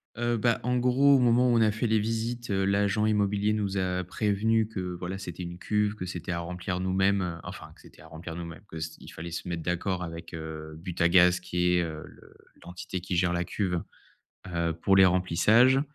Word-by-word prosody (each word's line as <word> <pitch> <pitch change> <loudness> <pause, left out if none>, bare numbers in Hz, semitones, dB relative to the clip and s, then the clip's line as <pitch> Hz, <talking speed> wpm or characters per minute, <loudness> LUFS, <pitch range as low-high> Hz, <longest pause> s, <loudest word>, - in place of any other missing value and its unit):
Heu 120 0 0
bah, 115 +1 +2
en 125 +1 +1
gros, 130 +3 +4
au - - +5
moment 125 +1 +4
où 120 - +3
on - - +3
a 110 -1 +4
fait 110 +3 -2
les 110 -1 +3
visites, 115 +2 -3
heu, 95 -1 +1
l'agent 100 +2 +2
immobilier 105 0 +1
nous 100 -2 -1
a 90 -1 -1
prévenus 110 +3 +1
que, 90 -2 -4
voilà, 90 +2 -5
c'était 90 -1 -7
une 85 +1 -7
cuve, 105 0 0
que 90 - -6
c'était 90 0 -5
à 85 - -2
remplir 90 +1 -4
nous-mêmes, 95 -2 +1
enfin, - - -9
que - - -20
c'était - - -17
à 80 - -14
remplir 80 +1 -8
nous-mêmes, 85 +2 -8
que 80 - -8
c 80 0 -5
il - - -12
fallait 85 +2 -8
se 85 +1 -5
mettre 85 -1 -3
d'accord 90 +2 -2
avec, 85 0 -8
heu, 80 -1 -7
Butagaz 90 0 +3
qui 90 0 0
est, 90 - +3
heu, 80 -2 -6
le - - -17 0.3
l'entité 90 +1 -6
qui 90 0 -4
gère 90 0 +2
la 85 0 0
cuve, 90 -1 -2 0.7
heu, 85 -1 0
pour 95 +4 +2
les 95 0 +7
remplissages, 105 +9 +4
95 Hz, 215 wpm, -28 LUFS, 85-105 Hz, 0.7 s, les